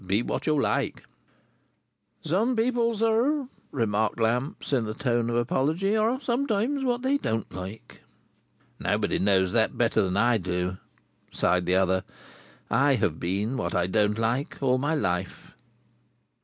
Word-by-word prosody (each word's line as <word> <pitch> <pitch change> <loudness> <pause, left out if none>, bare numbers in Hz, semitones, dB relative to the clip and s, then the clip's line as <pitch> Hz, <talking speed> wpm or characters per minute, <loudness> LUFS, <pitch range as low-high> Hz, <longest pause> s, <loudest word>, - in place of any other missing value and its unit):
Be 100 +5 0
what - - -3
you 155 -2 +3
like." - - -1 1.2
"Some 205 +11 +1
people, 235 0 +1
sir," 240 +6 +1 0.2
remarked 110 -3 0
Lamps, 125 +6 -1
in 120 -5 +1
a 110 - -4
tone 120 -2 0
of 120 - -1
apology, 155 - +1
"are 225 +4 +1
sometimes 255 +1 0
what 245 -1 0
they 270 +2 +2
don't 110 - -3
like." 95 +4 -9 0.8
"Nobody - - 0
knows 95 -2 +2
that 110 0 +1
better 115 -2 +2
than 95 0 -1
I 115 +1 +3
do," 90 0 -2 0.5
sighed 90 0 +1
the 90 - +3
other. 95 0 +2 0.6
"I 140 0 +3
have 100 -9 -1
been 100 +8 -1
what 85 -8 -2
I 90 -1 +2
don't 105 +2 +1
like, 115 +5 -1
all 130 -2 +2
my 145 +4 0
life." 90 - -3
120 Hz, 145 wpm, -26 LUFS, -, 1.2 s, you